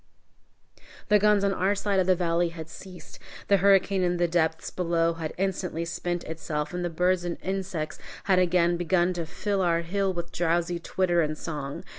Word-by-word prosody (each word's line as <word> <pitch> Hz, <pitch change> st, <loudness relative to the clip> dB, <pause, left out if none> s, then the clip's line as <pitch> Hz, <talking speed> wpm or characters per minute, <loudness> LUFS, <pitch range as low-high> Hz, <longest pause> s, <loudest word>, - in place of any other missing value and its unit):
The 210 Hz, 0 st, +6 dB
guns 210 Hz, 0 st, +4 dB
on 200 Hz, -1 st, +2 dB
our 195 Hz, +2 st, +1 dB
side 200 Hz, -1 st, 0 dB
of 185 Hz, -, +1 dB
the 185 Hz, -, +5 dB
valley 170 Hz, -1 st, +1 dB
had 160 Hz, -1 st, -9 dB
ceased, 185 Hz, +1 st, -12 dB, 0.3 s
the 200 Hz, -, +6 dB
hurricane 195 Hz, 0 st, +3 dB
in 175 Hz, -1 st, +1 dB
the 175 Hz, 0 st, +2 dB
depths 160 Hz, -1 st, 0 dB
below 170 Hz, -2 st, +1 dB
had 160 Hz, -2 st, -5 dB
instantly 180 Hz, -3 st, -2 dB
spent 175 Hz, +1 st, -3 dB
itself, 155 Hz, -1 st, -4 dB
and 180 Hz, 0 st, -3 dB
the 175 Hz, -, -1 dB
birds 180 Hz, +2 st, +1 dB
and 175 Hz, -1 st, -3 dB
insects 190 Hz, -4 st, -3 dB, 0.2 s
had 190 Hz, -2 st, +3 dB
again 175 Hz, -1 st, +3 dB
begun 175 Hz, +1 st, +1 dB
to 170 Hz, -2 st, -4 dB
fill 195 Hz, +3 st, -2 dB
our 170 Hz, -2 st, +2 dB
hill 195 Hz, +3 st, -1 dB
with 170 Hz, -1 st, -5 dB
drowsy 170 Hz, 0 st, 0 dB
twitter 175 Hz, 0 st, +1 dB
and 155 Hz, -1 st, -1 dB
song. 145 Hz, -4 st, -5 dB
175 Hz, 185 wpm, -27 LUFS, 165-190 Hz, 0.3 s, The